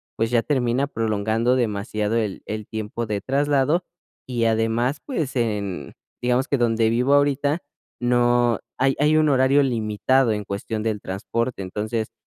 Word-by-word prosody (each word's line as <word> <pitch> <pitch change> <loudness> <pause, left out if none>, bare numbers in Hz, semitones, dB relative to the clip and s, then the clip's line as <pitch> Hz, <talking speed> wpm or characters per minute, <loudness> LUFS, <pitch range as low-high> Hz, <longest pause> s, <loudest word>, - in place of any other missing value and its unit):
pues, 115 +1 -1
ya 120 - +3
termina 130 0 0
prolongando 110 +1 0
demasiado 105 -1 -1
el 105 -4 -1
el 110 -1 -4
tiempo 110 +1 -4
de 105 -1 -2
traslado 145 - +1 0.5
y 120 -2 -1
además, 115 +5 +1
pues 155 - -3
en, 100 - -2 0.3
digamos 125 +2 +1
que 140 - +2
donde 115 -2 +2
vivo 125 +4 +2
ahorita, 145 +2 +2 0.4
no, 120 -1 +3 0.2
hay 135 +2 +3
hay 150 +1 +4
un 155 -1 +4
horario 135 +1 +4
limitado 115 +1 +1
en 105 -1 -3
cuestión 105 +2 -4
del 110 -2 -1
transporte. 115 +4 -3
Entonces, 110 +4 -3
120 Hz, 145 wpm, -23 LUFS, 110-135 Hz, 0.5 s, hay